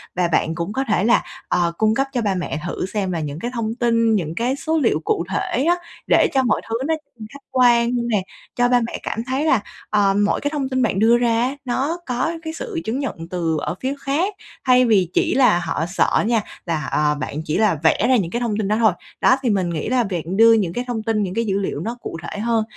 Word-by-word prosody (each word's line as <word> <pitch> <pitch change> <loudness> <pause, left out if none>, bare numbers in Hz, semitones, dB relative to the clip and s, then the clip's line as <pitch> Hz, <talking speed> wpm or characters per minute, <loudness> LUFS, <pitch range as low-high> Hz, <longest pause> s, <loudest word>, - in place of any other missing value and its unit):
Và 180 -1 +2
bạn 165 -1 0
cũng 170 +5 -3
có 265 - 0
thể 210 -4 +1
là, 235 +3 +3 0.2
ờ, 170 -1 +1
cung 220 0 +2
cấp 270 +2 +1
cho 245 - 0
ba 200 -3 0
mẹ 175 -3 -3
thử 175 - -3
xem 195 -1 -2
là 170 - -2
những 150 0 -4
cái 240 +7 -4
thông 225 -2 -2
tin, 230 -2 +2
những 165 -5 -2
cái 245 +6 0
số 320 +3 -1
liệu 230 - +2
cụ 165 - -1
thể 230 +6 -1
á, 345 +3 +3 0.3
để - - +5
cho 265 -1 +3
mọi 235 -4 +1
thứ 225 - -1
nó, 320 - +2 0.3
ừm, 215 - -7
khách 280 -1 -12
quan 240 -2 +4 0.2
nè. 215 -4 +1 0.3
Cho 245 0 +2
ba 245 0 +4
mẹ - - -5
cảm 225 - -3
thấy 265 +4 -1
là, 265 -7 +4 0.3
ờ, 205 -2 +3
mỗi - - 0
cái 290 - -1
thông 280 -4 -2
tin 260 -1 0
bạn 215 -5 +1
đưa 230 +3 +5
ra 235 -1 +2
á 255 +3 0
nó 270 +7 -1
có 250 +5 -1
cái 320 -1 -5
sự 405 -2 -5
chứng 230 +5 -2
nhận 205 -12 -5
từ 165 -3 -1
ở - - -3
phía 265 +1 -1
khác, 315 +10 -1 0.3
thay 255 -1 +5
vì 195 -7 +3
chỉ - - +2
là 250 -10 +4
họ 160 -1 -1
sợ 180 +3 +1
nha 230 -2 +2 0.2
là, 160 -5 -2
ờ, 150 0 +2
bạn 145 +2 -4
chỉ 155 - -1
là 215 -5 +3
vẽ 160 +6 +3
ra 260 - +5
những 185 -8 0
cái 240 - -1
thông 230 -4 -1
tin 215 -2 -1
đó 210 - +1
thôi. 220 -3 +5 0.3
Đó, - - +5
thì 255 - 0
mình 190 -4 +1
nghĩ 165 +3 -3
là 250 -1 +2
việc 180 -7 -3
đưa 225 +6 +5
những 195 -7 +1
cái 245 - -2
thông 230 -3 -3
tin, 220 -2 0
những 185 -2 -3
cái 230 +3 -1
dữ 195 -2 0
liệu 195 - -3
nó 235 +3 -4
cụ - - -6
thể 205 - -6
hơn 225 0 +1
225 Hz, 260 wpm, -21 LUFS, 185-250 Hz, 0.3 s, để